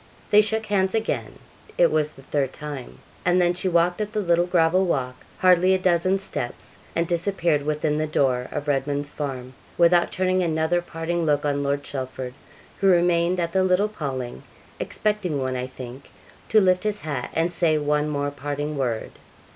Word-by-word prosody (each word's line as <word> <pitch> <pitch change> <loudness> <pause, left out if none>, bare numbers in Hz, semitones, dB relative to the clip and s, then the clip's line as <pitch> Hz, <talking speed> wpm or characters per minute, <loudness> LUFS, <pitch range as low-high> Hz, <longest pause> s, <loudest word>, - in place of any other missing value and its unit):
They 210 - +8
shook 220 +1 -1
hands 195 -1 +1
again 220 0 -2 0.4
it 170 - +5
was 155 -1 +1
the 135 - -15
third 135 -1 -1
time 145 -4 -7 0.3
and 180 +1 +3
then 175 0 +3
she 180 +1 -1
walked 175 +3 +2
up 210 - -2
the 215 - 0
little 175 -2 +2
gravel 180 +1 +3
walk, 130 -7 -1 0.2
hardly 185 0 +5
a - - +2
dozen 185 +1 +2
steps, 160 -10 -6 0.2
and 170 - +1
disappeared 170 -3 +1
within 150 +1 -1
the 155 0 0
door 130 -4 +1
of 145 - -4
Redman's 145 +1 -1
Farm, 130 -3 -5 0.2
without 175 0 +4
turning 185 0 +1
another 165 +1 +1
parting 170 0 -3
look 150 -2 +1
on 145 -1 0
Lord 140 0 -1
Chelford, 130 -2 -5 0.5
who 195 - +2
remained 175 0 +3
at 170 -1 -1
the 190 +1 +2
little 185 +2 +3
paling 130 - -5 0.4
expecting 210 -8 -1
one, 130 -1 -2
I 125 0 -3
think 130 +1 -10 0.4
to 220 - +6
lift 185 -1 +3
his 210 -1 -2
hat 140 -5 -4
and 165 +2 +1
say 165 -3 +2
one 150 0 0
more 145 -1 -1
parting 145 +1 -4
word. 120 -4 -2
165 Hz, 180 wpm, -24 LUFS, 145-180 Hz, 0.5 s, They